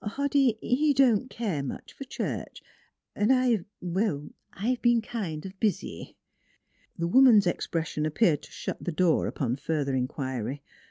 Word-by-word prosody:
" - - -22
Hoddy, 280 -5 +2
he 285 +3 +2
don't 255 -2 +3
care 200 -11 -2
much 140 - -7
for 275 - -8
church, 265 - -5 0.5
and 210 +4 +2
I 250 -7 +2 0.2
well, 175 -5 -1 0.2
I've 240 +5 -2
been 240 -1 +4
kind 200 -9 -5
of 190 0 -9
busy." 210 -3 -2 0.8
The 170 -1 -1
woman's 230 -1 +6
expression 160 -3 -1
appeared 155 -1 +2
to - - -15
shut - - -6
the 175 - -2
door 170 0 +2
upon 125 -2 -2
further 145 -1 -1
inquiry. 130 0 -3
190 Hz, 150 wpm, -27 LUFS, 150-240 Hz, 0.8 s, woman's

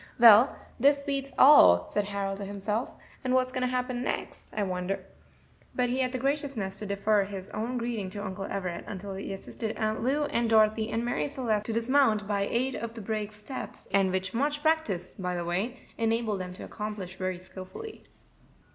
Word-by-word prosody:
"Well, 230 +2 +8 0.2
this 280 0 +4
beats 275 -1 -2
all," 90 - +8
said 205 - +1
Harold 200 -1 -2
to 200 - -5
himself; 205 +4 -3 0.3
"what 255 0 +3
is 255 - -10
going 255 -1 -2
to 250 - +2
happen 250 -1 -1
next, - - -4
I 210 - -1
wonder?" 185 0 -2 0.7
But 250 -1 +1
he 255 +2 0
had 255 -1 +1
the 255 - -2
graciousness 270 -7 -2
to 210 - -5
defer 200 +1 +2
his 195 -1 -7
own 235 +4 -3
greeting 230 -5 -2
to 205 +2 -6
Uncle 195 0 -4
Everett 180 -3 -3
until 195 0 -6
he 195 +1 -5
assisted 215 +3 -5
Aunt 215 0 -1
Lou 275 +5 +1
and 235 -5 0
Dorothy 220 0 +4
and 230 +1 -1
Marie 245 +4 0
Celeste 235 -7 -1
to 225 - -1
dismount, 230 -3 +3
by 200 -1 0
aid 255 +3 0
of 230 0 -5
the 225 - -6
brake's 215 0 -3
steps, 260 +5 -7
and 195 -1 +4
which 190 0 -2
much 290 +4 0
practice, 270 - 0
by 180 -1 -2
the 175 -1 -3
way, 200 +9 -2 0.2
enabled 225 -3 0
them 180 0 -6
to - - -9
accomplish 210 -4 -5
very 185 -1 -2
skilfully. 185 - -9
215 Hz, 190 wpm, -29 LUFS, 195-255 Hz, 0.7 s, Well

